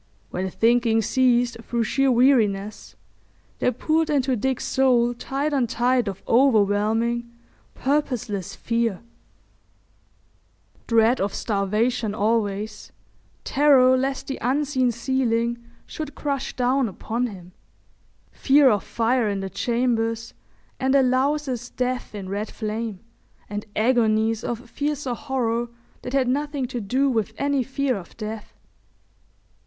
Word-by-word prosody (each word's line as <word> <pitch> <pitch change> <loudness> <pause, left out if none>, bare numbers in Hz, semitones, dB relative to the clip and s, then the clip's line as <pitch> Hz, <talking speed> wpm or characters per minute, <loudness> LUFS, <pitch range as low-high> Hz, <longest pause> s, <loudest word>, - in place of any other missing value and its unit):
When 190 +1 -2
thinking 230 +1 +2
ceased 245 0 +2
through 235 0 -1
sheer 270 +4 +2
weariness, 215 -5 +2 0.6
there - - +2
poured 315 +6 0
into 270 -3 +1
Dick's 260 +3 -1
soul 245 -3 +3
tide 275 +5 -3
on 260 -4 +2
tide 245 +1 +1
of 195 -1 -5
overwhelming, 230 -1 +2 0.5
purposeless 250 - -2
fear—dread 230 +1 -4
of 195 0 -1
starvation 215 +2 0
always, 210 -1 -1 0.5
terror 265 -3 +5
lest 270 +1 -1
the 270 - -5
unseen 260 -1 +1
ceiling 235 -1 -1 0.2
should 305 -3 -7
crush 280 -2 -3
down 255 0 +1
upon 235 +6 -3
him, 185 -5 -11 0.8
fear 275 -1 +4
of 205 -2 0
fire 230 -1 +1
in 200 -1 -2
the 195 0 -5
chambers 230 +1 -1 0.5
and 265 +1 +2
a 275 - +5
louse's 260 -1 0
death 250 -3 -3
in 195 -2 -6
red 205 +3 -3
flame, 215 -2 -4 0.5
and 205 +1 -5
agonies 220 -1 +2
of 240 +1 -4
fiercer 285 0 -2
horror 240 -2 -1 0.3
that 250 - -7
had 270 -2 +2
nothing 285 +1 -1
to 245 -1 -4
do 255 +8 +1
with 225 -6 0
any 280 -1 +1
fear 265 +1 -1
of 185 -4 -10
death. 215 -1 -7
240 Hz, 120 wpm, -23 LUFS, 220-265 Hz, 0.8 s, terror